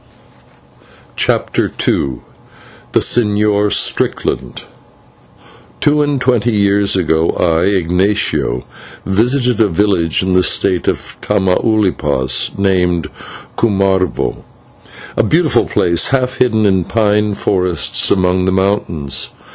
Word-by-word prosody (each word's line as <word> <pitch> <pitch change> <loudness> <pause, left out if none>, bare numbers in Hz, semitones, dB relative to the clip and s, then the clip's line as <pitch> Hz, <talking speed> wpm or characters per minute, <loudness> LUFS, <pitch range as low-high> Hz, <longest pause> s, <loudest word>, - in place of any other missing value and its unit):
CHAPTER - - 0 0.2
II 65 -3 -1 0.7
THE - - +3
SEÑOR 105 -2 +1
STRICKLAND - - -1 1.2
Two 150 0 +2
and 145 -2 0
twenty 120 -2 +1
years 100 0 +2
ago, 80 -3 +1
I, 85 0 +2
Ignatio, 95 - 0 0.4
visited 120 +4 +1
a 110 - +4
village 90 -3 0
in 95 0 -1
the 90 - +4
State 90 0 0
of - - -3
Tamaulipas, 95 - 0
named 90 -4 0 0.4
Cumarvo, 95 -4 0 0.8
a - - +3
beautiful - - +1
place, 85 0 +1
half 130 -1 -1
hidden 110 -4 +1
in 95 -3 +2
pine 105 -2 0
forests 90 -5 0
amongst 90 -1 +1
the - - +2
mountains. 95 -8 -2
100 Hz, 100 wpm, -14 LUFS, 90-105 Hz, 1.2 s, a